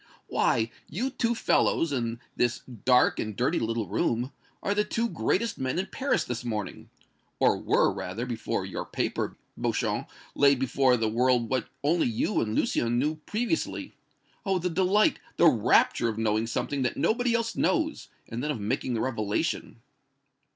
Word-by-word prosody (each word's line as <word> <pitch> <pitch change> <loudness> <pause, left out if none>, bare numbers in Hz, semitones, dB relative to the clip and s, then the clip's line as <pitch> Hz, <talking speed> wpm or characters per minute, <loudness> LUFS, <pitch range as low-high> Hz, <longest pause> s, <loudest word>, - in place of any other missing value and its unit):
Why, 115 -1 +1 0.2
you 240 - -2
two 235 -2 0
fellows, 165 -7 +2
in 115 -3 -2 0.2
this 120 -1 +1
dark 125 +1 +2
and 110 -2 -3
dirty 130 - +1
little 115 -2 -1
room, 120 +8 0 0.3
are 200 - +1
the 210 +1 +2
two 230 +2 -1
greatest 230 0 -1
men 130 +3 -1
in 185 - 0
Paris 275 +1 0
this 120 -1 -4
morning 110 -4 -4 0.5
or - - +4
were, - - +2
rather, 105 +7 -4
before 115 -4 -2
your - - -4
paper, - - -2 0.2
Beauchamp, - - -1 0.2
laid 140 -1 +5
before 130 0 +3
the 115 -1 0
world 120 +1 +2
what 130 -4 0 0.2
only 160 +2 +2
you 120 - 0
and 110 0 -2
Lucien 120 0 +1
knew 150 +5 0
previously. 245 +9 -2 0.5
Oh! 195 -4 +1
the 180 0 -1
delight, 190 +4 +3 0.2
the - - +5
rapture 120 - +4
of 110 - -4
knowing 110 0 +1
something 135 +4 -2
that 125 - -1
nobody 235 - +2
else 230 0 -1
knows, 315 -1 0 0.2
and 120 +3 -5
then 150 - -1
of 145 -6 -2
making 120 +4 -1
the 110 - -1
revelation!" 115 +1 -2
130 Hz, 165 wpm, -27 LUFS, 115-185 Hz, 0.5 s, laid